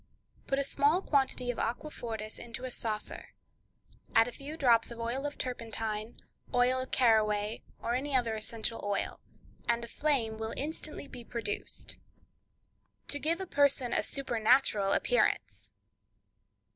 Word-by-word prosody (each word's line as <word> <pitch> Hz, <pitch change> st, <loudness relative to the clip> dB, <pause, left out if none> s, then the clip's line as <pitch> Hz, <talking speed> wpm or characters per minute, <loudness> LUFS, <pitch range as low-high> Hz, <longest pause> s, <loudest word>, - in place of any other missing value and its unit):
—Put 270 Hz, -, +1 dB
a 280 Hz, -, +2 dB
small 290 Hz, +6 st, +2 dB
quantity 265 Hz, -3 st, +1 dB
of 245 Hz, -, -7 dB
aquafortis 230 Hz, -4 st, -4 dB
into 240 Hz, +1 st, -7 dB
a 255 Hz, -, -4 dB
saucer, 215 Hz, -3 st, -2 dB, 0.8 s
add 225 Hz, +1 st, +7 dB
a -, -, -4 dB
few 285 Hz, +6 st, -7 dB
drops 235 Hz, -6 st, +4 dB
of 235 Hz, -1 st, -6 dB
oil 245 Hz, +5 st, -1 dB
of 290 Hz, -, -7 dB
turpentine, 225 Hz, -3 st, -3 dB, 0.4 s
oil 250 Hz, +1 st, +4 dB
of 255 Hz, -, -4 dB
caraways, 215 Hz, -3 st, +3 dB, 0.2 s
or 235 Hz, -, 0 dB
any 270 Hz, +3 st, -1 dB
other 235 Hz, -3 st, +2 dB
essential 225 Hz, +1 st, -3 dB
oil, 205 Hz, -1 st, -1 dB, 0.5 s
and 235 Hz, 0 st, +2 dB
a -, -, -10 dB
flame 235 Hz, -5 st, +1 dB
will 220 Hz, 0 st, -3 dB
instantly 300 Hz, 0 st, -4 dB
be 245 Hz, -3 st, -9 dB
produced. 230 Hz, -3 st, -4 dB, 1.1 s
To 290 Hz, -, +3 dB
Give 325 Hz, +4 st, +1 dB
a 380 Hz, -, -3 dB
Person 280 Hz, -6 st, +3 dB
a -, -, +3 dB
Supernatural 235 Hz, -5 st, +2 dB
Appearance. 100 Hz, -, +1 dB
240 Hz, 140 wpm, -31 LUFS, 220-275 Hz, 1.1 s, add